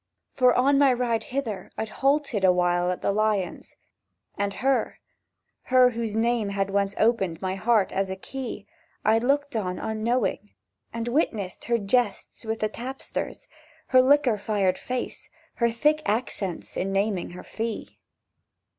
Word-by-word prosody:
For, 250 Hz, -2 st, +4 dB
on 275 Hz, +2 st, +4 dB
my 280 Hz, -2 st, +6 dB
ride 240 Hz, -2 st, 0 dB
hither, 245 Hz, -7 st, -4 dB
I'd 220 Hz, -, -3 dB
halted 275 Hz, -6 st, +1 dB
Awhile 180 Hz, -1 st, +3 dB
at 180 Hz, -, -3 dB
the -, -, +2 dB
Lions, 205 Hz, -3 st, -1 dB, 0.6 s
And 200 Hz, 0 st, -2 dB
her—her 255 Hz, -1 st, 0 dB
whose 225 Hz, -2 st, -3 dB
name 230 Hz, -2 st, +1 dB
had 195 Hz, 0 st, -1 dB
once 200 Hz, 0 st, 0 dB
opened 195 Hz, -8 st, +1 dB
My 185 Hz, -1 st, -2 dB
heart 210 Hz, +1 st, +2 dB
as 195 Hz, 0 st, -1 dB
a 190 Hz, -, -3 dB
key— 235 Hz, 0 st, -6 dB, 0.4 s
I'd 225 Hz, +2 st, +4 dB
looked 285 Hz, +1 st, +1 dB
on, 185 Hz, -4 st, -1 dB
unknowing, 220 Hz, -1 st, -1 dB, 0.4 s
and 230 Hz, 0 st, -4 dB
witnessed 225 Hz, -, -1 dB
Her 235 Hz, 0 st, +2 dB
jests 225 Hz, +2 st, -1 dB
with 220 Hz, 0 st, -3 dB
the 215 Hz, -, +2 dB
tapsters, 255 Hz, +5 st, -6 dB, 0.4 s
Her 255 Hz, -1 st, +7 dB
liquor 260 Hz, -4 st, +4 dB
fired 200 Hz, -3 st, 0 dB
face, 250 Hz, 0 st, -4 dB, 0.3 s
her 235 Hz, -1 st, +3 dB
thick 300 Hz, +7 st, +2 dB
accents 205 Hz, -5 st, -2 dB
In 195 Hz, +1 st, -1 dB
naming 195 Hz, -1 st, 0 dB
her -, -, -9 dB
fee. 225 Hz, 0 st, -5 dB
220 Hz, 145 wpm, -26 LUFS, 195-250 Hz, 0.6 s, Her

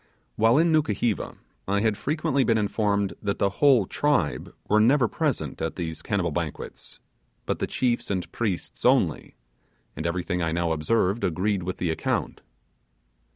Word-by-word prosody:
While 115 Hz, +4 st, +4 dB
in 165 Hz, +1 st, +4 dB
Nukuheva 120 Hz, -7 st, 0 dB, 0.3 s
I 100 Hz, +1 st, +1 dB
had 110 Hz, -1 st, +2 dB
frequently 140 Hz, +1 st, 0 dB
been 115 Hz, -2 st, +2 dB
informed 100 Hz, -2 st, 0 dB
that 100 Hz, -1 st, -1 dB
the 100 Hz, -, +1 dB
whole 135 Hz, -8 st, +6 dB
tribe 145 Hz, -, 0 dB, 0.2 s
were 105 Hz, -, +4 dB
never 125 Hz, +3 st, +4 dB
present -, -, -2 dB
at 80 Hz, -, -2 dB
these 80 Hz, -3 st, -4 dB
cannibal 95 Hz, -5 st, -1 dB
banquets, 80 Hz, -1 st, -5 dB, 0.5 s
but -, -, -2 dB
the -, -, -1 dB
chiefs 120 Hz, -2 st, -1 dB
and 95 Hz, -3 st, -2 dB
priests 105 Hz, -7 st, -3 dB
only; -, -, +2 dB, 0.6 s
and 80 Hz, +3 st, -3 dB
everything 90 Hz, +1 st, -2 dB
I 80 Hz, -1 st, 0 dB
now 85 Hz, 0 st, 0 dB
observed 95 Hz, +7 st, +1 dB
agreed 95 Hz, +3 st, 0 dB
with 90 Hz, +1 st, -4 dB
the 85 Hz, -2 st, -1 dB
account. 80 Hz, -, -2 dB
100 Hz, 155 wpm, -25 LUFS, 85-115 Hz, 0.6 s, whole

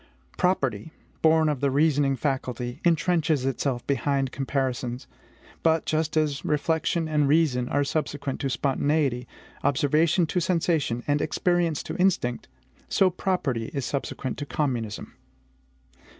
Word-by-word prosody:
Property, 140 Hz, -, 0 dB, 0.3 s
born 160 Hz, 0 st, +4 dB
of 150 Hz, -3 st, 0 dB
the 140 Hz, -, +2 dB
reasoning 145 Hz, -1 st, +2 dB
faculty, 130 Hz, -1 st, -3 dB
intrenches 165 Hz, -4 st, +2 dB
itself 135 Hz, -2 st, -1 dB
behind 135 Hz, 0 st, 0 dB
comparisons. 130 Hz, -3 st, -2 dB, 0.6 s
But, 160 Hz, -1 st, +2 dB
just 155 Hz, 0 st, 0 dB
as 150 Hz, -3 st, 0 dB
reflection 160 Hz, +2 st, 0 dB
and 150 Hz, -2 st, +2 dB
reason 140 Hz, -5 st, +2 dB
are 145 Hz, -, +1 dB
subsequent 145 Hz, -2 st, -2 dB
to 135 Hz, -, -1 dB
spontaneity, 135 Hz, 0 st, 0 dB, 0.4 s
observation 155 Hz, +5 st, +3 dB
to 180 Hz, -, -1 dB
sensation, 165 Hz, -9 st, 0 dB
and 145 Hz, 0 st, +1 dB
experience 175 Hz, -2 st, 0 dB
to -, -, -6 dB
instinct, 180 Hz, -10 st, +1 dB, 0.4 s
so 190 Hz, -1 st, +3 dB
property 150 Hz, -11 st, -1 dB
is 140 Hz, -3 st, -1 dB
subsequent 135 Hz, 0 st, -3 dB
to 145 Hz, -, -5 dB
communism. 120 Hz, -9 st, -2 dB
145 Hz, 120 wpm, -26 LUFS, 130-160 Hz, 0.6 s, born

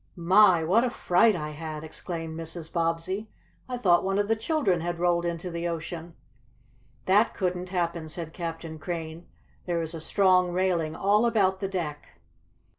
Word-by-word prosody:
"My! 180 Hz, 0 st, +5 dB
what 195 Hz, +9 st, +3 dB
a 255 Hz, -, +1 dB
fright 215 Hz, -1 st, +3 dB
I 150 Hz, -3 st, -4 dB
had!" 155 Hz, 0 st, -6 dB
exclaimed 165 Hz, 0 st, -6 dB
Mrs. 165 Hz, 0 st, -7 dB
Bobbsey. 170 Hz, +5 st, -1 dB, 0.4 s
"I 250 Hz, -, -2 dB
thought 180 Hz, -7 st, +4 dB
one 195 Hz, +1 st, 0 dB
of 205 Hz, 0 st, +1 dB
the 225 Hz, -, +2 dB
children 220 Hz, -, 0 dB
had 175 Hz, +1 st, -3 dB
rolled 175 Hz, 0 st, +1 dB
into 170 Hz, +1 st, -3 dB
the 170 Hz, +1 st, -3 dB
ocean!" 165 Hz, 0 st, -5 dB, 0.9 s
"That 205 Hz, +4 st, +3 dB
couldn't 180 Hz, -1 st, -2 dB
happen," 170 Hz, -3 st, -2 dB
said 160 Hz, 0 st, -6 dB
Captain 165 Hz, -2 st, -6 dB
Crane. 165 Hz, +1 st, -5 dB, 0.4 s
"There 170 Hz, -1 st, 0 dB
is 165 Hz, 0 st, -4 dB
a 165 Hz, -, -6 dB
strong 185 Hz, 0 st, +3 dB
railing 175 Hz, -4 st, 0 dB
all 210 Hz, +6 st, +3 dB
about 195 Hz, -5 st, +2 dB
the 195 Hz, -, -2 dB
deck." 150 Hz, -, -5 dB
175 Hz, 165 wpm, -27 LUFS, 165-190 Hz, 0.9 s, My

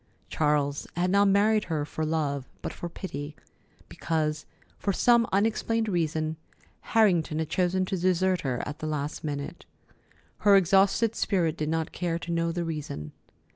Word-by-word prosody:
Charles 145 Hz, -2 st, 0 dB
had 180 Hz, +1 st, +1 dB
not 200 Hz, +1 st, +5 dB
married 210 Hz, +2 st, +3 dB
her 155 Hz, -4 st, -2 dB
for 155 Hz, -, -4 dB
love, 145 Hz, -4 st, -1 dB
but -, -, -4 dB
for 175 Hz, -, -6 dB
pity, 150 Hz, -4 st, -6 dB, 0.5 s
because, 155 Hz, -2 st, -2 dB, 0.3 s
for 200 Hz, -, 0 dB
some 235 Hz, +3 st, +4 dB
unexplained 225 Hz, +2 st, +1 dB
reason, 160 Hz, -4 st, -1 dB, 0.6 s
Harrington 175 Hz, -8 st, +3 dB
had 160 Hz, -1 st, -2 dB
chosen 185 Hz, +2 st, +1 dB
to 190 Hz, -, -2 dB
desert 185 Hz, 0 st, +1 dB
her 125 Hz, -3 st, -2 dB
at 145 Hz, -, -6 dB
the 155 Hz, -, -4 dB
last 150 Hz, 0 st, -3 dB
minute. 145 Hz, +2 st, -5 dB, 0.8 s
Her 205 Hz, -1 st, +6 dB
exhausted 195 Hz, +4 st, +4 dB
spirit 170 Hz, -6 st, +1 dB
did 155 Hz, -2 st, -2 dB
not 160 Hz, 0 st, -1 dB
care 170 Hz, -2 st, -2 dB
to 170 Hz, 0 st, -6 dB
know 170 Hz, 0 st, 0 dB
the 170 Hz, 0 st, -2 dB
reason. 150 Hz, -, -5 dB
165 Hz, 155 wpm, -27 LUFS, 150-190 Hz, 0.8 s, Her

